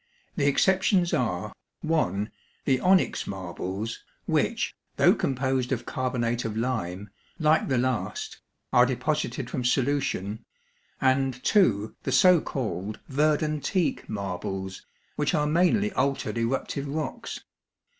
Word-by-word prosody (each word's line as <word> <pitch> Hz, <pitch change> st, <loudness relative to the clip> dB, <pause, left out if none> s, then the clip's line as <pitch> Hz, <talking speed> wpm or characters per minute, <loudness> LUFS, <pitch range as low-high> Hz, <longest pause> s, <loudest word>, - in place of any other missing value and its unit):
The 145 Hz, -6 st, +1 dB
exceptions 185 Hz, +3 st, +3 dB
are 105 Hz, -8 st, -1 dB, 0.3 s
(1) 105 Hz, -, 0 dB, 0.3 s
the 130 Hz, -2 st, +3 dB
onyx 185 Hz, 0 st, +3 dB
marbles, 95 Hz, +3 st, -5 dB, 0.2 s
which, -, -, 0 dB, 0.2 s
though -, -, +6 dB
composed 130 Hz, -1 st, 0 dB
of 120 Hz, -2 st, -1 dB
carbonate 125 Hz, -2 st, -1 dB
of 110 Hz, -1 st, -3 dB
lime, 105 Hz, -5 st, -2 dB, 0.3 s
like 155 Hz, -1 st, +3 dB
the 130 Hz, -, +1 dB
last, 130 Hz, -, -2 dB, 0.3 s
are -, -, +6 dB
deposited -, -, -1 dB
from 130 Hz, -8 st, -2 dB
solution, 125 Hz, -6 st, 0 dB, 0.6 s
and 130 Hz, -1 st, +2 dB
(2) 110 Hz, -, +3 dB
the -, -, -3 dB
so 180 Hz, -4 st, +6 dB
called 105 Hz, -5 st, -4 dB
verdantique 155 Hz, +4 st, +1 dB
marbles, 95 Hz, -2 st, -4 dB, 0.3 s
which 150 Hz, +3 st, +1 dB
are 150 Hz, -1 st, +2 dB
mainly 180 Hz, +7 st, +3 dB
altered 135 Hz, -, 0 dB
eruptive 135 Hz, +4 st, -1 dB
rocks. 150 Hz, +2 st, -4 dB
130 Hz, 115 wpm, -27 LUFS, 110-155 Hz, 0.6 s, though